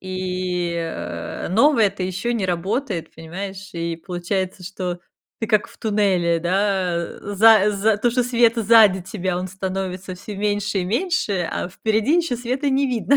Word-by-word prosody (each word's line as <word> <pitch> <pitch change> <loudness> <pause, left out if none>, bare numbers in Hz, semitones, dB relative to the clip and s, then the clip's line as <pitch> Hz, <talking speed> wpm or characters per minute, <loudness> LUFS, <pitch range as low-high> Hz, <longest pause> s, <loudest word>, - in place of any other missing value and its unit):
и, 185 -2 -2
э, 85 - -5
новое 225 - +4
то 195 -1 -6
еще 185 +6 -2
не 215 -5 -1
работает, 185 - -2
понимаешь? 190 +4 -7
И 170 -1 -3
получается, 180 +2 -3
что 180 -1 -4 0.4
ты 225 - -1
как 215 -1 +3
в - - -18
туннеле, 195 -6 +1
да, 185 +1 0
э, 170 0 -4 0.2
за 215 0 +6
за 205 +1 +2
то, 240 +4 +1
что 250 +1 +1
света 235 -1 +2
сзади 210 -4 +6
тебя, 185 -2 -3
он 185 +1 -4
становится 190 -1 -4
всё 200 +3 -8
меньше 205 0 -1
и 180 - -1
меньше, 210 - 0
а - - -3
впереди 220 - +1
еще 325 -8 0
света 255 +4 -1
не 270 +1 +2
видно. 250 +2 +2
195 Hz, 165 wpm, -22 LUFS, 180-225 Hz, 0.4 s, за